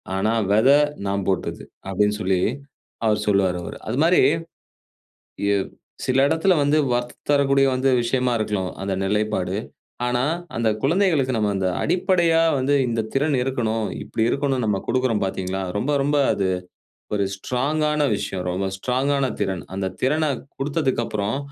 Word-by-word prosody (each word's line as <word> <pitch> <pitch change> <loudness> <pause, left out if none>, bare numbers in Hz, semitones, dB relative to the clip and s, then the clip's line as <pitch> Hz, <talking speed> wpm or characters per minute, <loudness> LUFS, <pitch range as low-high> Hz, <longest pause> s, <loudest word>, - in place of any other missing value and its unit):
ஆனா 100 +3 +1 0.2
வெத, 110 +5 +4 0.4
நா 100 - -1 0.2
போட்டது. 95 - -2 0.3
அப்படின்னு 105 +2 +1
சொல்லி, 95 -1 +1 0.7
அவர் 105 -1 +2
சொல்வாரு, 95 -3 +2
அவரு. - - -7
அதுமாரி. 160 +10 +3 1.3
ஏவ் 100 -1 0 0.4
சில 130 +1 +3
இடத்தில 165 +5 +3
வந்து, 145 +2 +2 0.2
வரத்து 120 0 -2 0.2
தரக்கூடிய 140 -1 +4
வந்து 130 +1 +1
விஷயமா 125 +1 0
இருக்கணும் 105 -4 -2
அந்த 100 - -1
நிலைப்பாடு. 100 -2 0 0.5
ஆனா, 125 0 +1 0.3
அந்த 115 -1 +1
குழந்தைகளுக்கு 150 -6 +2
நம்ம, 105 -1 +1
அந்த 95 -1 0 0.2
அடிப்படையா 175 -2 +2 0.2
வந்து, 135 +2 +1
இந்த 115 -1 0
திறன் 145 +1 +2
இருக்கணும், 115 -4 -1 0.2
இப்படி 110 - -2
இருக்கணும். 135 -2 0
நம்ம 105 -2 +1
கொடுக்கிறோம் 125 -4 +1
பாத்தீங்களா? 95 0 -3 0.2
ரொம்ப, 130 +8 -1
ரொம்ப 145 +1 +1 0.2
அது, 95 -2 0 0.7
ஒரு 100 - +1
ஸ்ட்ராங்கான 150 +7 0
விஷயம். 95 -2 -4
ரொம்ப 95 +2 -2
ஸ்ட்ராங்கான 135 +5 0 0.2
திறன். 95 -3 -2
அந்த 95 -1 -1
திறனக் 145 0 0 0.2
கொடுத்ததுக்கப்புறம், 130 -7 -1
125 Hz, 135 wpm, -22 LUFS, 100-140 Hz, 1.3 s, வெத